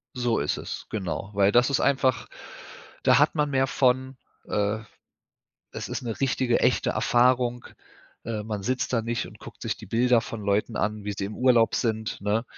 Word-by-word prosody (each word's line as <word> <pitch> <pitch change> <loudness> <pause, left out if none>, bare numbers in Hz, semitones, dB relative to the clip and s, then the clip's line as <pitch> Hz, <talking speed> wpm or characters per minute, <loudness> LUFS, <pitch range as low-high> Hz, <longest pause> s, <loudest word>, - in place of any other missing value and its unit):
So 120 -2 0
ist 70 - -1
es, - - -6
genau. 95 -3 -4
Weil 100 0 +3
das 120 +4 +4
ist 140 - +1
einfach 130 -3 +1 0.8
da 130 -1 +5
hat 150 +2 +4
man 150 -1 +1
mehr 135 -1 +2
von 130 0 +1 0.3
äh, 105 +1 0 0.9
es - - -6
ist - - -4
'ne 115 -3 -4
richtige, 130 -3 +1
echte - - +2
Erfahrung. 120 0 +2 0.6
Äh, 110 -2 -3
man 105 -2 -4
sitzt 130 +4 -1
da 115 -2 +1
nicht 115 +1 -2
und - - -14
guckt - - -12
sich - - -2
die - - -11
Bilder 120 +1 +3
von 110 -1 -7
Leuten 105 +2 0
an, 105 -1 -2
wie 105 - -2
sie 100 - -3
im 105 - -8
Urlaub 120 -3 +4
sind, 110 -2 -2
ne? 105 +3 0
120 Hz, 185 wpm, -26 LUFS, 105-130 Hz, 0.9 s, da